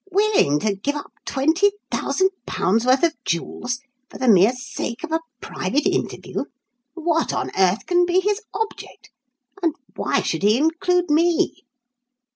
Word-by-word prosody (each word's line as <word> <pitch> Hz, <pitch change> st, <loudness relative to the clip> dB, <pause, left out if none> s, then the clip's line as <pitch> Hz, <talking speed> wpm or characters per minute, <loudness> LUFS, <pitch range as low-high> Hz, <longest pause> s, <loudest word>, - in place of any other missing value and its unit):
"Willing 395 Hz, -, +3 dB
to 210 Hz, -2 st, 0 dB
give 280 Hz, +9 st, -2 dB
up 290 Hz, -, -7 dB, 0.2 s
£20,000 335 Hz, -, 0 dB
worth 260 Hz, +3 st, +4 dB
of 335 Hz, -1 st, +4 dB
jewels 245 Hz, +8 st, -3 dB, 0.3 s
for -, -, -10 dB
the 260 Hz, -, -1 dB
mere 205 Hz, +1 st, +6 dB
sake 245 Hz, 0 st, -5 dB
of 325 Hz, -, -5 dB
a 320 Hz, -, +2 dB, 0.2 s
private 290 Hz, +2 st, -2 dB
interview! -, -, -2 dB, 0.5 s
What 330 Hz, -1 st, 0 dB
on -, -, -2 dB
earth 190 Hz, +2 st, +2 dB
can 355 Hz, 0 st, +3 dB
be 360 Hz, +1 st, +3 dB
his 410 Hz, +2 st, 0 dB
object? 445 Hz, -1 st, -6 dB, 0.5 s
And 330 Hz, -4 st, +1 dB, 0.2 s
why -, -, 0 dB
should 160 Hz, -, -2 dB
he 210 Hz, +3 st, +4 dB
include 335 Hz, +3 st, +1 dB
me?" 330 Hz, -2 st, +2 dB
305 Hz, 140 wpm, -22 LUFS, 240-355 Hz, 0.5 s, mere